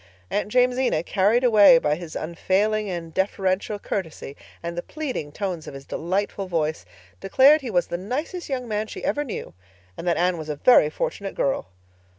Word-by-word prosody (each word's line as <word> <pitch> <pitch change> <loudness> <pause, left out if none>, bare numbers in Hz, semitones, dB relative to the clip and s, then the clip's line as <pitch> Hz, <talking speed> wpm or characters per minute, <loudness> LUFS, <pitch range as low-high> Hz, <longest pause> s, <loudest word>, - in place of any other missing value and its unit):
Aunt 205 0 -1
Jamesina, 250 -8 +2
carried 210 +7 +2
away 230 +1 +7
by 150 -11 +1
his 165 0 -6
unfailing 200 +6 0
and 170 -3 -5
deferential 190 +1 0
courtesy, 165 -8 -5 0.3
and 170 0 -4
the 175 - -2
pleading 260 - -5
tones 180 -2 -4
of - - -8
his 135 0 -10
delightful 195 +3 -2
voice, 155 - -1 0.3
declared 275 +9 +5
he 260 - -5
was 175 -5 +1
the 175 - -4
nicest 295 - -4
young 255 -3 -3
man 215 0 -2
she - - -8
ever 295 - 0
knew, 255 - -6 0.4
and 175 - -7
that 170 - +2
Anne 175 -1 +1
was 155 -1 -7
a 150 - -2
very 150 - +5
fortunate 195 +5 -4
girl. 135 - -1
195 Hz, 175 wpm, -24 LUFS, 170-240 Hz, 0.4 s, away